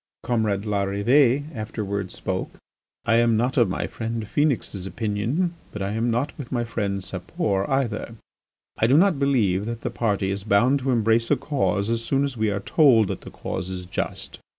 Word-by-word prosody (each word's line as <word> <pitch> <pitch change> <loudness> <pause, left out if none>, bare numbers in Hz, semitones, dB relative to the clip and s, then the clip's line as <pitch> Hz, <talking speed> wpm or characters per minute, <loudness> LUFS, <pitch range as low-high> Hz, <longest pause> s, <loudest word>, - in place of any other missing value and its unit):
Comrade 110 -5 0
Larrivée 110 +7 +2
afterwards 100 -4 -4
spoke. - - -3 0.5
"I 115 0 +4
am 115 -1 +3
not 125 +3 0
of 120 -6 +4
my 95 - -2
friend, 115 -1 -4
Phœnix's 115 -8 0
opinion 115 - -1 0.2
but 105 - -4
I 100 - -2
am 115 +3 0
not 120 +5 -1
with 135 - -7
my 120 -2 0
friend 100 -4 -2
Sapor 95 +1 -2
either. 120 -4 -1 0.6
I 110 - +4
do 135 +4 +5
not 180 -4 +4
believe 110 -8 +2
that 115 -1 -4
the - - -3
party 100 -4 0
is 100 0 -3
bound 115 +7 +3
to 135 0 -3
embrace 115 -1 +2
a 145 - +5
cause 100 - 0
as 115 0 -1
soon 135 +3 +1
as 140 -2 -2
we 110 -2 +1
are 100 0 -2
told 120 - +4
that - - -4
that - - -11
cause 90 - -4
is 90 -1 -5
just. 90 - -5
115 Hz, 185 wpm, -24 LUFS, 100-125 Hz, 0.6 s, do